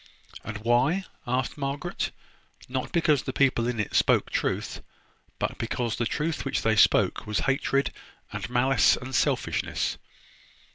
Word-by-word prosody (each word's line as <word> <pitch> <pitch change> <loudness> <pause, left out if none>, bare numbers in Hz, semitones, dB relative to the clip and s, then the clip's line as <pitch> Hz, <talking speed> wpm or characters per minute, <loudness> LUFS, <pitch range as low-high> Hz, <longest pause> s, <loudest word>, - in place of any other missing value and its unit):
"And 110 0 -5
why?" 125 - +2 0.2
asked 125 +3 -1
Margaret. 140 +5 -2 0.6
"Not 130 0 -3
because 155 -5 +3
the 130 - -4
people 130 -4 +2
in 120 -2 -2
it 105 - -2
spoke - - +3
truth; - - -2 0.6
but - - -3
because 115 0 -2
the 120 - 0
truth 160 +4 -2
which 135 - -1
they 110 -1 +3
spoke 110 - +3
was 105 - 0
hatred, 135 +1 +1 0.4
and - - -4
malice, 125 +1 +4
and 130 +1 -8
selfishness." - - 0
130 Hz, 140 wpm, -27 LUFS, 120-140 Hz, 0.6 s, malice